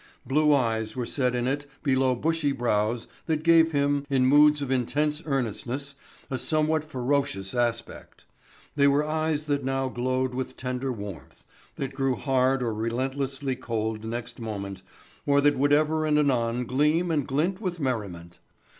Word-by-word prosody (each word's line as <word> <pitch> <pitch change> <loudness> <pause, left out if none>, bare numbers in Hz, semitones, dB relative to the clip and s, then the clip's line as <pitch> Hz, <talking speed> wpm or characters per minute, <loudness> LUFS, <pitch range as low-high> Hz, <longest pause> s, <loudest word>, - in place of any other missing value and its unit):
Blue 150 +3 +3
eyes 115 -5 +1
were 125 -2 -2
set 125 -1 0
in 120 0 0
it 145 +2 -2 0.2
below 130 -2 +2
bushy 160 +2 0
brows 115 -2 0 0.2
that 155 -2 0
gave 165 -1 +5
him, 145 -1 +1
in 130 -2 +3
moods 150 +2 +6
of 135 - -4
intense 150 +4 0
earnestness, 135 +1 -2 0.4
a 130 - -1
somewhat 155 +2 +1
ferocious 130 -9 -1
aspect. 120 -1 -3 0.5
They 140 -1 +4
were 140 +2 +3
eyes 155 -1 -1
that 145 -2 -1
now 135 0 -1
glowed 130 +1 -1
with 130 +1 -4
tender 125 +1 -3
warmth, 100 - -8 0.3
that 135 -1 -4
grew 135 -1 0
hard 130 0 +1
or 115 -2 -1
relentlessly 130 +4 -2
cold 110 -2 -3
next 115 +2 -5
moment 100 -4 -5 0.5
or 140 0 +4
that 145 +1 +4
would 145 +1 +3
ever 155 +1 +2
and 150 -1 +3
anon 125 -4 +1
gleam 150 +8 +1
and 145 -4 0
glint 170 +9 0
with 180 -4 -3
merriment. 100 - -4
135 Hz, 155 wpm, -26 LUFS, 120-145 Hz, 0.5 s, moods